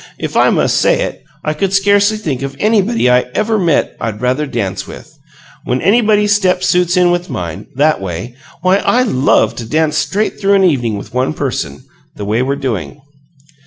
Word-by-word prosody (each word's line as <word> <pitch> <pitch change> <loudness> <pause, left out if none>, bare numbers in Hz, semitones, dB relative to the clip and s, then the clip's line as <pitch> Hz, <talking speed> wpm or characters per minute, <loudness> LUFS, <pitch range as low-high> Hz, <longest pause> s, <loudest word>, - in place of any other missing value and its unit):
If - - -5
I - - +4
must - - +1
say - - +2
it, - - -4 0.2
I 155 - -1
could 190 +5 -2
scarcely 205 +2 +3
think 145 -11 -3
of 135 0 -5
anybody 215 - +2
I 125 0 +3
EVER 220 0 +1
met 170 -6 +1
I'd 110 -2 -3
rather 130 +5 0
dance 100 -7 -3
with. - - -12 0.5
When 125 +1 -1
anybody's 210 - +3
step 185 -3 +1
suits 180 0 +2
in 180 -1 +4
with 175 0 -2
mine, 90 +3 -5
that 150 -3 +2
way, 95 +5 -5 0.3
why, 185 +1 +4
I 245 +4 +2
LOVE 140 - +2
to 115 -2 -7
dance 155 0 +1
straight 210 +1 -2
through 200 0 +3
an 195 - +3
evening 120 - +1
with 100 - -10
one 130 +4 0
person, 75 - -4 0.3
the 105 - -6
way 110 +4 0
we're 135 +2 0
doing." 105 - -4
155 Hz, 190 wpm, -15 LUFS, 125-195 Hz, 0.5 s, I